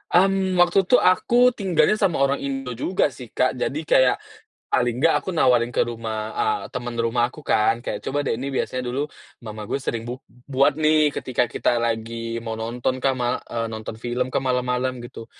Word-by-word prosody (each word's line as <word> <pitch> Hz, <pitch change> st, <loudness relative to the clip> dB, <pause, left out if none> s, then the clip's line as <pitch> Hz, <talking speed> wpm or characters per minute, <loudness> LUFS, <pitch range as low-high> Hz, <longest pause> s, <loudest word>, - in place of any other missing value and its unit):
Mmm, 190 Hz, 0 st, +3 dB
waktu 175 Hz, +2 st, +4 dB
tuh 250 Hz, -, +5 dB
aku 240 Hz, +7 st, +4 dB
tinggalnya 205 Hz, -1 st, +2 dB
sama 195 Hz, -5 st, +2 dB
orang 140 Hz, 0 st, +1 dB
Indo 135 Hz, -2 st, -4 dB
juga 145 Hz, +6 st, 0 dB
sih, 125 Hz, -2 st, -10 dB
Kak. 130 Hz, +3 st, +1 dB
Jadi 150 Hz, +5 st, -2 dB
kayak, 130 Hz, -4 st, +4 dB, 0.5 s
paling 120 Hz, -1 st, +1 dB
enggak 160 Hz, +4 st, +4 dB
aku -, -, -5 dB
nawarin 125 Hz, -6 st, +3 dB
ke -, -, +2 dB
rumah 115 Hz, -1 st, -5 dB, 0.3 s
eee, 425 Hz, 0 st, 0 dB
temen 120 Hz, -2 st, -4 dB
rumah 115 Hz, +1 st, +1 dB
aku -, -, -12 dB
kan, 110 Hz, -6 st, +3 dB
kayak, -, -, -3 dB
"Coba 145 Hz, -, -1 dB
deh, 140 Hz, -, -1 dB
ini 135 Hz, +3 st, -4 dB
biasanya 130 Hz, -1 st, -2 dB
dulu 125 Hz, +3 st, -2 dB, 0.4 s
mama 110 Hz, -2 st, -7 dB
gue 135 Hz, -, -2 dB
sering 115 Hz, -3 st, -3 dB
bu 120 Hz, -, -4 dB, 0.3 s
buat 140 Hz, +1 st, +2 dB
nih, 155 Hz, -1 st, +4 dB
ketika 125 Hz, -1 st, 0 dB
kita -, -, 0 dB, 0.2 s
lagi 115 Hz, 0 st, -2 dB, 0.3 s
mau 115 Hz, -, -3 dB
nonton 120 Hz, +3 st, -2 dB
kan, 135 Hz, -, +3 dB
ma," 120 Hz, -1 st, 0 dB, 0.2 s
eee, 115 Hz, -1 st, -2 dB
"nonton 110 Hz, 0 st, -6 dB
film 125 Hz, +1 st, -1 dB
kah, -, -, -1 dB
malam-malam," 125 Hz, 0 st, 0 dB
gitu. 120 Hz, -1 st, -9 dB
130 Hz, 190 wpm, -23 LUFS, 120-155 Hz, 0.5 s, tuh